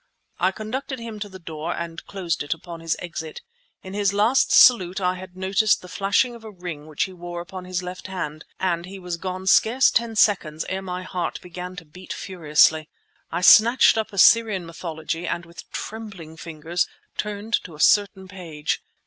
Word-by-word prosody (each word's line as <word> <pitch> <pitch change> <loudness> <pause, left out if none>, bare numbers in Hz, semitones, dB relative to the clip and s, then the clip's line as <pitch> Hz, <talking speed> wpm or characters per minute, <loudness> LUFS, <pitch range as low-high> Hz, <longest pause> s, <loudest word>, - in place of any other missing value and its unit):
I 185 +2 +3
conducted 255 +7 -5
him 230 -3 -7
to 205 0 -5
the 190 - -10
door 165 -1 -5
and 170 0 -6
closed 175 -5 -2
it 145 +2 -1
upon 165 +1 -10
his 165 -1 -1
exit. 165 -3 -6 0.4
In 190 - -8
his 200 -1 +1
last 225 +6 +3
salute 190 -7 +6
I 180 -1 +1
had 185 0 -10
noticed 195 +3 +2
the - - -9
flashing 200 +7 +1
of 235 -1 -12
a 220 - -8
ring 175 -6 -8
which 155 -2 -1
he 190 - -5
wore 175 -1 -7
upon 180 +1 -8
his 185 0 -3
left 180 +1 -7
hand, 155 -5 -5 0.2
and 175 -2 -1
he 195 +1 -8
was 180 -2 -5
gone 185 +1 -5
scarce 230 +7 +5
ten 230 -1 0
seconds 170 -8 +2
ere 190 +1 -2
my 180 -1 -5
heart 180 -1 -3
began 180 +1 -7
to 170 -2 -9
beat 180 +5 -9
furiously. 155 -3 +2 0.4
I 170 - -2
snatched 235 +6 +7
up 220 -1 -2
"Assyrian 205 -1 +5
Mythology" 165 0 -5
and 170 - -2
with 170 0 -13
trembling 200 -8 -7
fingers 165 +1 -2 0.3
turned 210 +1 -4
to 165 - -10
a - - -15
certain 195 +1 +3
page. 170 -6 -4
185 Hz, 185 wpm, -23 LUFS, 170-200 Hz, 0.4 s, snatched